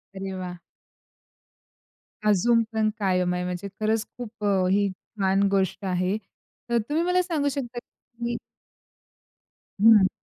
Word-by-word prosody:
अरे 190 0 -4
वाह! 180 -1 -5 1.7
अजून 230 +3 +4
पण 220 -1 +2
कायम 180 -2 +1
आहे 180 - -1
म्हणजे 180 +2 -4
खरंच 220 0 +1
खूप 230 -3 -8
अ, 195 -2 +3
ही 200 0 +3
छान 195 +1 -1
गोष्ट 195 0 0
आहे. 185 +2 0 0.5
तर 235 - +3
तुम्ही 315 +3 +1
मला 360 +1 +3
सांगू 315 -5 0
शकता 250 -3 -4
की 235 0 -7 1.4
हं. 215 -3 +8
210 Hz, 125 wpm, -26 LUFS, 190-235 Hz, 1.7 s, हं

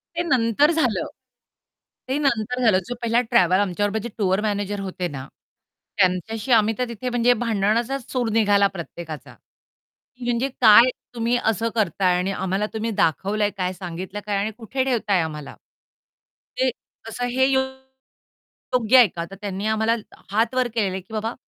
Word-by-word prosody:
ते 345 - 0
नंतर 255 +1 +3
झालं. 270 -9 0 1.0
ते 270 - 0
नंतर 250 -3 0
झालं. 200 -5 +4
जो 245 - -4
पहिला 235 +1 +2
ट्रॅव्हल 185 -5 +3
आमच्याबरोबर 205 +2 0
जे 235 - -4
टूर 190 -1 +1
मॅनेजर 205 -1 -2
होते 185 -2 -4
ना, 135 -2 -7 0.7
त्यांच्याशी 205 +6 0
आम्ही 220 -1 +4
तर 250 - 0
तिथे 235 +2 -4
म्हणजे 245 0 +3
भांडणाचाच 230 +4 0
सूर 245 -3 0
निघाला 205 -2 +4
प्रत्येकाचा. 155 -7 -8 0.9
म्हणजे, 240 +2 0
"काय 230 +4 +8 0.3
तुम्ही 235 +1 +1
असं 225 +1 +1
करत 210 -2 -1
आहे? 180 -1 +4
आणि 190 +2 -1
आम्हाला 190 +2 -1
तुम्ही 220 +1 -2
दाखवलं 200 +2 0
आहे 205 - +1
काय? 185 0 -1
सांगितलं 185 +2 -7
आहे 205 - -6
काय 205 -1 -1
आणि 210 +2 -1
कुठे 255 +3 -2
ठेवताय 215 -8 +1
आम्हाला? 150 -3 -6 1.0
ते 260 0 +2 0.4
असं 245 +2 -3
हे, 260 +2 +1
अ, - - +4 1.1
योग्य 250 +1 +4
आहे 240 -4 +8
का?" 170 -1 -6
तर - - -8
त्यांनी 200 0 -4
आम्हाला 220 +1 +1 0.4
हात 225 +4 +1
वर 255 -1 +2
केलेल 200 -4 +1
आहे, 190 - -4
की 210 +4 -17
"बाबा 220 +2 -2
215 Hz, 165 wpm, -23 LUFS, 190-240 Hz, 1.1 s, काय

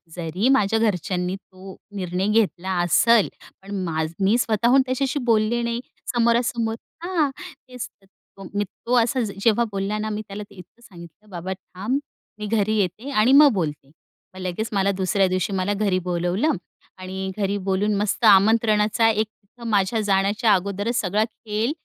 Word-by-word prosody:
जरी 180 +8 -1
माझ्या 225 -4 +3
घरच्यांनी 180 -3 -1
तो 190 -1 -13 0.2
निर्णय 185 +1 -2
घेतला 200 -4 +1
असेल, 225 +5 +4 0.3
पण 195 0 -5
माझं 160 -1 -2
मी 215 +5 +4
स्वतःहून 235 +3 +3
त्याच्याशी 260 +2 -1
बोलले 220 +2 +2
नाही 235 0 -2 0.3
समोरासमोर 235 -1 +1 0.3
हां, 335 -6 +1 0.2
तेच 255 -7 -9 0.5
तो 195 - -10
मी 205 0 0
तो 235 +5 -3
असा 245 +3 -1 0.2
जेव्हा 225 +3 +3
बोलला 195 +2 -2
ना 215 0 -3
मी 215 0 -3
त्याला 205 +1 -6
ते 200 - -17
इतकं 185 +6 -15
सांगितलं, 175 0 -14
"बाबा 185 +1 -5
थांब, 195 +7 -4 0.4
मी 210 - -4
घरी 215 0 +1
येते 210 +8 -2
आणि 230 0 +3
मग 285 0 +8
बोलते." 150 -7 -3 0.5
मग - - -9
लगेच 185 +5 -3
मला 195 0 +2
दुसऱ्या 190 0 +1
दिवशी 185 +2 -1
मला 190 +2 0
घरी 200 -3 +1
बोलावलं 180 - +1 0.5
आणि 190 +1 -5
घरी 200 0 0
बोलून 200 +2 +1
मस्त 210 +3 0
आमंत्रणाचा 215 +2 +4
एक 215 0 +1
तिथं 225 +2 -13
माझ्या 205 +1 +1
जाण्याच्या 205 +3 +2
अगोदरच 200 +5 -1
सगळा 205 +2 +1
खेळ, 220 +2 -3
205 Hz, 155 wpm, -23 LUFS, 190-230 Hz, 0.5 s, मग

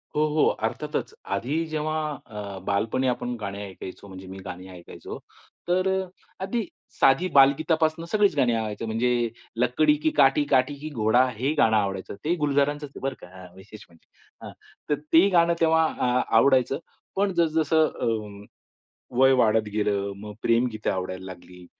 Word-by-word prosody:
हो, 150 +1 +3
हो, 155 - +3 0.2
अर्थातच. - - -3
आधी 130 +11 -1
जेव्हा 155 0 -2 0.3
अ, 105 -2 -7
बालपणी 110 +6 0
आपण 125 0 -2
गाणी 100 0 -5
ऐकायचो, 95 0 -9
म्हणजे 95 -1 -11
मी 95 +1 -9
गाणी 90 0 -8
ऐकायचो, 90 -2 -10 0.5
तर 185 +2 +1 0.5
आधी, 215 +4 -2 0.3
साधी 135 +7 +4
बालगीतापासून 155 +4 +3
सगळीच 210 -4 +3
गाणी 125 -4 +3
आवडायचं, 110 -1 -3
म्हणजे 120 +1 0 0.3
लकडी 125 +6 +3
की - - +4
काठी, 135 +2 +5
काठी 130 +3 +2
की 155 +2 -6
घोडा 120 -1 +3
हे 135 +6 0
गाणं 110 -6 +4
आवडायचं. 100 -2 -2
ते 170 +3 +2
गुलजारांचच 145 +1 +1
आहे - - -12
बरं 135 -1 -2
का - - -11 0.2
अ, - - -11
विशेष 105 +3 -13
म्हणजे. 85 -1 -24 0.4
हां, - - -8 0.4
तर 145 -1 +1
तेही 170 +5 +7
गाणं 170 -2 +4
तेव्हा 160 0 +4
अ, 125 0 +2 0.2
आवडायचं. 130 +2 +3 0.4
पण 200 0 +1
जसं 160 -2 +2
जसं 155 +1 +3
अ, 105 -3 -4 0.7
वय 135 0 +6
वाढत 110 -1 +2
गेलं, 100 -1 -1
मग 105 +1 -9
प्रेमगीत 115 -2 0
आवडायला 95 0 -3
लागली. 90 -1 -12
125 Hz, 155 wpm, -25 LUFS, 105-155 Hz, 0.7 s, तेही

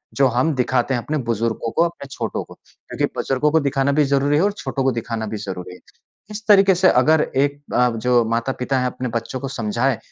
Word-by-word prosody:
जो 135 -1 +4
हम 130 +6 +1
दिखाते 130 0 0
हैं 120 - 0
अपने 155 - -2
बुजुर्गों 115 0 -2
को, 165 - +2
अपने 170 -5 -6
छोटों 115 -4 -3
को। - - -14
क्योंकि - - -6
बुजुर्गों 135 +3 0
को 160 - +4
दिखाना 140 -1 0
भी 150 +1 +3
ज़रूरी 140 +1 +1
है - - +3
और 205 - +2
छोटों 135 0 -3
को 135 - +2
दिखाना 115 -1 -4
भी 105 0 -4
ज़रूरी 95 -3 -7
है। - - -16 0.5
इस 210 +1 -7
तरीके 195 -2 +6
से 185 +1 +4
अगर 160 -2 +4
एक 145 +1 +1
अ, 125 0 +3
जो 120 +1 +2
माता-पिता 125 +3 -1
हैं 125 - 0
अपने 125 0 -4
बच्चों 115 +3 -3
को 135 - -5
समझाएँ 120 +1 -1
130 Hz, 220 wpm, -21 LUFS, 115-145 Hz, 0.5 s, तरीके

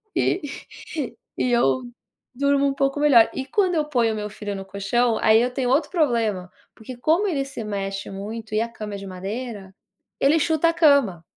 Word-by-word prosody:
e 370 - +1 1.0
e 250 - 0
eu 240 +1 +2 0.5
durmo 280 +1 +2
um 275 - 0
pouco 275 +1 0
melhor. 265 -7 +6
E 265 - -4
quando 380 -4 +1
eu 305 -1 +1
ponho 240 -6 +1
o - - -4
meu 210 0 -4
filho 205 -1 -6
no 195 0 -7
colchão, 215 +4 0
aí 220 +1 +5
eu 250 +1 0
tenho 250 -2 -1
outro 285 +6 +2
problema, 230 - 0 0.2
porque 240 +3 -10
como 335 +10 +2
ele 275 -6 -1
se 265 -4 -7
mexe 195 -1 -4
muito 215 +2 -6
e 215 - +2
a 230 - -1
cama 210 -3 -7
é - - -4
de 195 - -8
madeira, 195 +1 -6 0.5
ele 300 +4 +4
chuta 320 +2 +2
a - - 0
cama. 280 - +3
240 Hz, 195 wpm, -23 LUFS, 210-280 Hz, 1.0 s, melhor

